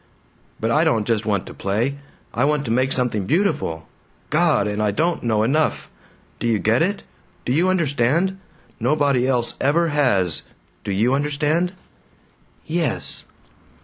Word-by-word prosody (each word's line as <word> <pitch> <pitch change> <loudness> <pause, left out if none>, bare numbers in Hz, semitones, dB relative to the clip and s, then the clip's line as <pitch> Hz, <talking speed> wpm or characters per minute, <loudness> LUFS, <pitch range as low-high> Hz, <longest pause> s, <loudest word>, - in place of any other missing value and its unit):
"But 115 +1 0
I 150 +5 +4
don't 115 -10 +2
just 110 -1 0
want 100 -3 0
to - - -9
play. 115 +8 -1 0.3
I 120 - +1
want 145 0 +1
to 115 - -2
make 130 +3 +1
something 115 -6 0
beautiful. 135 - 0 0.4
God! 155 -8 +3
And 105 +1 -2
I 105 - +2
don't 165 - 0
know 110 -2 +1
enough. 150 +7 0 0.5
Do - - -1
you 115 -2 +2
get 110 +4 +2
it? 195 +4 0 0.4
Do 125 - 0
you 175 +6 +3
understand? 170 +2 +1 0.4
Nobody 135 0 +2
else 125 -3 0
ever 165 +5 +2
has! 100 - +1 0.4
Do 100 - -3
you 110 +7 +2
understand?" 150 +5 0 0.9
"Yes." 160 -4 -1
135 Hz, 145 wpm, -21 LUFS, 110-155 Hz, 0.9 s, I